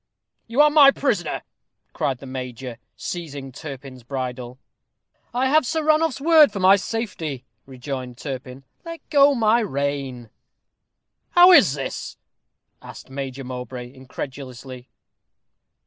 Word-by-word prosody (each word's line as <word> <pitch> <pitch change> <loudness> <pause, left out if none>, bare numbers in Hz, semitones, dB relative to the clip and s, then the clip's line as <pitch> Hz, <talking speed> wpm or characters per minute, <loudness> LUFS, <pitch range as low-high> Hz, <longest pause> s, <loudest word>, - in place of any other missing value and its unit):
"You 235 +5 +3
are 300 0 +5
my 290 -2 +8
prisoner," 210 - -1 0.5
cried 135 -3 -1
the 135 - -12
major, 125 -2 -7 0.2
seizing 145 -6 -6
Turpin's 135 -2 -9
bridle. 125 -1 -5 0.7
"I 255 +2 0
have 310 +4 +4
Sir 315 +5 -2
Ranulph's 310 -2 +2
word 310 -3 +6
for 200 - -5
my 190 +1 +6
safety," 180 - -4 0.2
rejoined 130 -2 -6
Turpin. 130 -1 -7 0.2
"Let 335 -2 -9
go 285 -1 +5
my 225 -1 +3
rein." 140 - -3 1.0
"How 355 +1 +8
is 225 - +6
this?" 135 -2 -6 0.6
asked - - -12
Major 135 0 -5
Mowbray, 125 0 -7
incredulously. 130 -1 -9
140 Hz, 115 wpm, -22 LUFS, -, 1.0 s, my